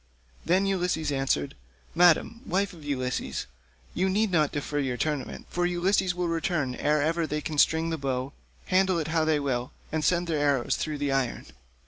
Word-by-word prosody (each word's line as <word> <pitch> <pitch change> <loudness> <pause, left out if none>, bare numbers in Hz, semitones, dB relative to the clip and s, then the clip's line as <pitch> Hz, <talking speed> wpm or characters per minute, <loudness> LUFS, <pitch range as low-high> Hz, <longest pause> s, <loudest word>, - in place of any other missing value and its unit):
Then 185 +3 +3
Ulysses 180 -5 0
answered, 135 - 0 0.4
"Madam, 180 +7 +4
wife 200 +1 0
of 165 -3 -13
Ulysses, 130 -3 -2 0.5
you 190 +2 +1
need 210 +2 +1
not 155 -4 +2
defer 145 0 -2
your 130 -3 -1
tournament, 145 -2 -3
for 175 0 +1
Ulysses 180 +1 +1
will 180 -1 -1
return 165 -5 -1
ere 150 +3 +1
ever 165 +1 0
they 150 - -2
can 150 -1 -3
string 160 +2 +3
the 160 - -2
bow, 135 0 -2 0.3
handle 185 -1 +3
it 160 -1 -2
how 160 -1 +2
they 155 -1 +2
will, 125 -3 -2 0.2
and 155 -1 -1
send 175 +1 +2
their 160 -3 -1
arrows 140 -4 +2
through 155 -2 -3
the 145 -1 -1
iron." 135 -3 -1
155 Hz, 180 wpm, -27 LUFS, 140-175 Hz, 0.5 s, Madam